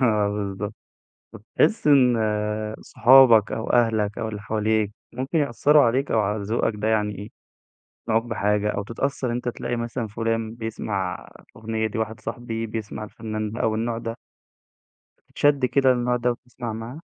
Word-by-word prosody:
بالضبط، 105 -3 0 0.6
فتحس 125 - 0
إن 130 -5 +5 0.6
صحابك 120 -4 +6
أو 110 - -3
أهلك 110 -3 +2
أو 110 - -2
اللي 105 -2 -6
حواليك 110 -1 0 0.2
ممكن 130 +6 -2
يأثروا 145 +1 +4
عليك 130 +4 +1
أو 110 - +3
على 105 0 -1
ذوقك 110 +2 0
ده، 105 +1 -2
يعني 105 -2 +1
إيه 105 +3 -8 0.8
يقنعوك 115 0 +2
بحاجة 105 -2 0
أو 100 - -3
تتأثر 125 +3 -2
أنت، 120 +1 -3
تلاقي 120 0 -3
مثلًا 115 0 -3
فلان 115 +1 -2
بيسمع 105 -5 -4 0.3
أغنية 110 0 -2
دي، 110 +2 -4
واحد 110 0 -3
صاحبي 115 -2 -4
بيسمع 110 -1 -5
الفنان 110 0 -5
ده 115 - -6
أو 110 - +1
النوع 115 +1 -1
ده. 115 0 -5 1.1
تتشد 145 -2 +2
كده 135 0 +3
للنوع 125 0 0
ده 125 0 +1
و - - 0
تسمع 120 -1 -7
معاه؟ 115 +7 -7
115 Hz, 155 wpm, -24 LUFS, 105-120 Hz, 1.1 s, صحابك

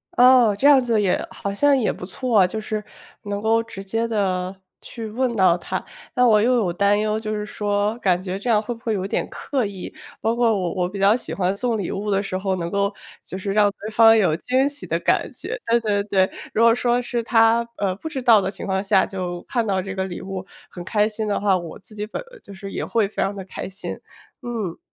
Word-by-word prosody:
哦， 245 -4 +6
这 280 - +4
样 285 -2 +8
子 230 -3 +1
也 190 -3 +1
好 200 0 -4
像 285 +5 +3
也 235 - +1
不 180 - -8
错 235 +2 0
啊， 185 - +5
就 220 +4 -4
是， 215 0 -3 0.4
能 205 0 -4
够 225 +1 +3
直 210 -4 -9
接 225 +4 -1
地 190 -4 -1 0.3
去 230 -2 -8
问 245 +2 -1
到 185 -4 +4
他。 - - -4 0.3
那 250 - +4
我 215 -3 +5
又 250 +4 +3
有 195 -7 +1
担 200 +3 +2
忧， 215 0 0
就 215 -1 -4
是 210 0 -3
说 205 0 -1
感 185 -3 +1
觉 190 +1 -4
这 245 - -4
样 215 -2 +4
会 240 +3 -4
不 230 - -14
会 225 - 0
有 190 -1 -2
点 - - -2
刻 265 -6 -2
意？ 195 -2 -7 0.3
包 225 +1 +1
括 235 -1 +3
我 180 -3 -2
我 180 -2 -1
比 200 0 -7
较 200 +3 +5
喜 245 - -5
欢 190 0 0
送 235 0 -1
礼 195 - -3
物 205 +2 -3
的 195 0 +1
时 190 - -4
候， 190 0 -1
能 170 -1 -4
够 200 0 +1 0.3
就 185 - -7
是 195 +1 -3
让 205 0 +4
对 215 - -6
方 225 0 +7
有 180 -7 +3
惊 260 +6 +1
喜 290 0 -6
的 - - 0
感 - - +1
觉。 - - -6
对 235 +1 +4
对 205 -2 +1
对， 190 -2 +2 0.2
如 225 - +3
果 230 0 +7
说 245 0 +1
是 240 -1 -2
他， 230 0 +3
呃， 195 -2 0
不 320 +9 -6
知 280 - -4
道 225 -4 +6
的 190 - -1
情 195 - -7
况 190 0 -1
下 195 -1 +3
就 180 -2 -5
看 235 -3 0
到 190 -1 +1
这 195 +1 -6
个 190 0 -2
礼 175 -2 -6
物， 190 -1 -5 0.3
很 175 - -8
开 210 +2 +1
心 215 0 -4
的 205 - 0
话， 200 -2 +3
我 170 -2 -5
自 215 - -16
己 210 0 -5
本 225 - -5 0.2
就 200 - -12
是 195 +1 -8
也 - - -3
会 225 -3 +1
非 205 - -4
常 200 - -1
地 195 - -6
开 190 - -7
心。 195 +1 -6 0.5
嗯。 230 -8 -4
210 Hz, 265 characters per minute, -22 LUFS, 195-230 Hz, 0.5 s, 样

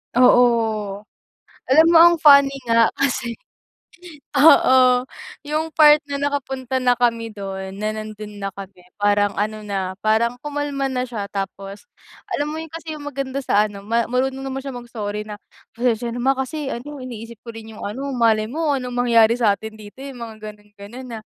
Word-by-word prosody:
Oo. 225 -5 +3 0.7
Alam 315 +5 +6
mo - - +9
ang 345 0 +6
funny 280 -3 +7 0.2
nga 230 -1 +4
kasi 260 -3 -1 1.0
oo, 260 -4 +6 0.4
yung 310 +1 -3
part 300 -1 +7
na 285 -1 -5
nakapunta 265 -2 -2
na 250 -1 +3
kami 230 -2 0
do'n 190 -2 -6
na 215 +2 -3
nando'n 215 -1 -8
na 195 -1 -4
kami 195 -2 -11 0.2
parang 205 0 +2
ano 215 0 -3
na 190 -2 -3
parang 225 +3 +2
kumalma 290 -2 -3
na 250 -1 -1
siya. 220 -4 -4
Tapos, 195 0 -6 0.4
alam 290 +1 -2
mo 315 - -5
yun 325 - -8
kasi 325 0 -7
yung 295 -1 -9
maganda 275 -1 -4
sa 210 -6 +2
ano 205 -1 -10
ma 230 +2 +1
marunong 265 +3 -2
naman 270 0 -4
siyang 270 -2 -7
mag-sorry 210 -3 -5
na, 210 -1 -9 0.3
"Pasensiya 235 -1 -1
na 245 - -5
ma. 265 +2 +2
Kasi 270 +2 -4
ano 280 +3 -7
iniisip 230 -3 -9
ko 235 - -9
rin 225 0 -10
yung 215 - -11
ano 270 +7 -4
malay 225 -3 +2
mo 300 0 0
anong 250 -2 -5
mangyari 235 -2 +4
sa'tin 220 -1 0
dito, 210 +1 -13
eh, 275 - -7
yung 245 - -12
mga 225 -1 -8 0.2
gano'n, 210 0 -24
gano'n 235 +6 -10
na. 230 -2 -7
240 Hz, 175 wpm, -21 LUFS, 215-270 Hz, 1.0 s, mo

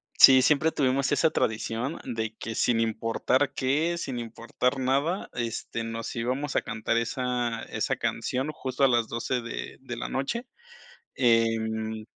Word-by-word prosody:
Sí, 130 -1 +9
siempre 150 +4 +3
tuvimos 135 -2 +1
esa 160 +3 +4
tradición 115 +1 -1
de 110 -3 -3
que, 115 0 -6
sin 120 -2 +2
importar 115 +5 +1
qué, 150 +6 +1
sin 135 -7 -4
importar 120 +3 -2
nada, 140 +8 0
este, 115 -1 -3
nos 115 0 -5
íbamos 130 +5 -2
a - - +3
cantar 110 +2 -1
esa 120 -1 -1
esa - - -2
canción 130 +4 -2
justo 135 -2 -3
a - - +8
las 120 -3 +2
12 120 +2 -2
de 115 - -6
de 130 -2 -6
la - - -4
noche. 235 - -2 0.7
Em 110 -2 +1
125 Hz, 150 wpm, -27 LUFS, 115-135 Hz, 0.7 s, Sí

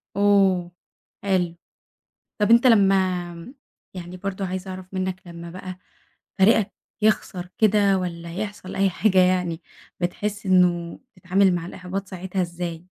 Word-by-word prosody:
أوه! 195 -3 +3 0.5
حلو. 180 -3 0 0.8
طب 210 0 +1
أنت 235 +2 +7
لمّا 190 -2 +2 0.4
يعني 180 0 -8
برضه 195 +1 -4
عايزة 185 +1 -5
أعرف 185 0 -9
منك، 185 0 -2
لمّا 170 0 -9
بقى 185 0 -8 0.6
فريقك 200 +1 +4 0.3
يخسر 190 -4 0
كده 205 -2 +4
والّا 170 -2 -5
يحصل 205 -1 -5
أي 195 0 +3
حاجة 190 +1 +2
يعني 180 -2 +2 0.4
بتحس 205 +4 -3
إنه 175 -2 +2 0.2
تتعامل 185 0 +2
مع 165 - -3
الإحباط 185 +2 -6
ساعتها 190 0 -3
إزاي؟ 170 -1 -5
185 Hz, 125 wpm, -23 LUFS, 175-195 Hz, 0.8 s, أنت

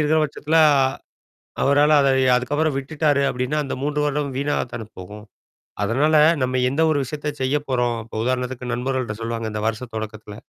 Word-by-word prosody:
இருக்கிற 155 +1 +2
பட்சத்தில 150 +2 -2
ஆ - - +4 0.9
அவரால 145 +2 +4
அத 140 - +3 0.3
அதுக்கப்புறம் 145 +4 0
விட்டுட்டாரு 145 0 0
அப்படின்னா 125 +4 -2
அந்த 135 - -4
3 150 +1 -1
வருடம் 145 -2 -2
வீணாக 145 +1 0
தானே 115 -3 -6
போகும். 105 +3 -10 0.6
அதனால 135 +9 +2 0.3
நம்ம 130 0 0
எந்த 140 +5 -1
ஒரு 155 - +2
விஷயத்த 150 +3 -6
செய்ய 130 +3 +1
போறோம். 120 -2 0 0.3
உதாரணத்துக்கு 125 0 -2
நண்பர்கள்ட்ட 125 -2 -2
சொல்லுவாங்க 115 0 -3
இந்த 105 0 -4
வருஷம் 115 +2 -4
தொடக்கத்துல. 110 -1 -6
130 Hz, 155 wpm, -22 LUFS, 120-145 Hz, 0.9 s, ஆ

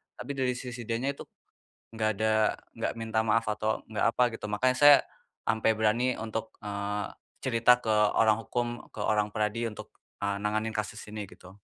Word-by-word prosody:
Tapi 125 +3 -6
dari 130 -3 0
sisi 125 -2 -7
dianya 120 +4 0
itu, 140 - -10 0.7
nggak 110 -1 0
ada 110 +1 +1 0.4
nggak - - -2
minta 110 -1 -1
maaf, 110 +1 +2
atau, 110 +1 -2
nggak 105 - +1
apa, 125 - +4
gitu, 110 -2 -6
makanya 125 +5 +1
saya 145 -1 +10 0.5
sampai 110 0 +2
berani 115 +4 +2
untuk, 110 0 -5
eee, 100 0 -3 0.3
cerita 125 -1 +4
ke 110 -3 0 0.2
orang 110 -1 +5
hukum, 120 +2 -1 0.2
ke - - -14
orang 105 0 +1
PERADI, 105 +2 -1
untuk 105 - -11 0.2
nanganin 105 +2 -1
kasus 105 0 -3
ini, 105 0 -6
gitu. 95 +2 -15
110 Hz, 165 wpm, -29 LUFS, 105-120 Hz, 0.7 s, saya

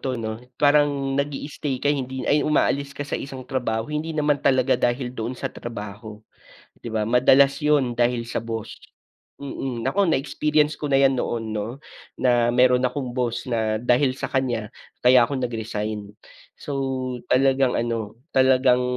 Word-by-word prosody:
'to 130 -2 -2
'no. 110 -1 -4 0.2
Parang 145 -2 +3
nag-i-stay 140 0 -3
ka - - 0
hindi 130 -2 -4
ay, 145 +1 +4
umaalis 140 -2 +1
ka 145 - -3
sa - - -3
isang 135 -1 -7
trabaho, 115 -4 -2
hindi 150 +2 -3
naman 150 -1 +2
talaga 130 -1 +3
dahil 125 +1 0
doon 115 0 -4
sa - - -3
trabaho, 105 -1 -8 0.6
di, - - -9
ba? 110 -1 0
Madalas 135 +3 +5
yun 145 -5 +2
dahil 120 0 +1
sa - - -2
boss. 115 -1 -5 0.6
Mm. 135 -4 -5
Naku, 200 -1 +2
na-experience 150 +1 +1
ko 150 - -2
na 135 -1 +3
'yan 135 -1 +4
noon 115 -2 -3
'no 105 +1 -2 0.5
na 120 -2 +3
meron 125 +1 +4
akong 125 -1 -4
boss 120 -2 -2
na 110 -3 0
dahil 125 +2 +2
sa - - -5
kanya, 120 -5 -1 0.3
kaya 125 -1 +7
ako 140 - -3
nag-resign. 110 -4 -4 0.4
So 145 - -8 0.6
talagang 135 -1 +3
ano, 115 -2 -2 0.2
talagang, 130 -1 +4
130 Hz, 155 wpm, -23 LUFS, 115-140 Hz, 0.6 s, kaya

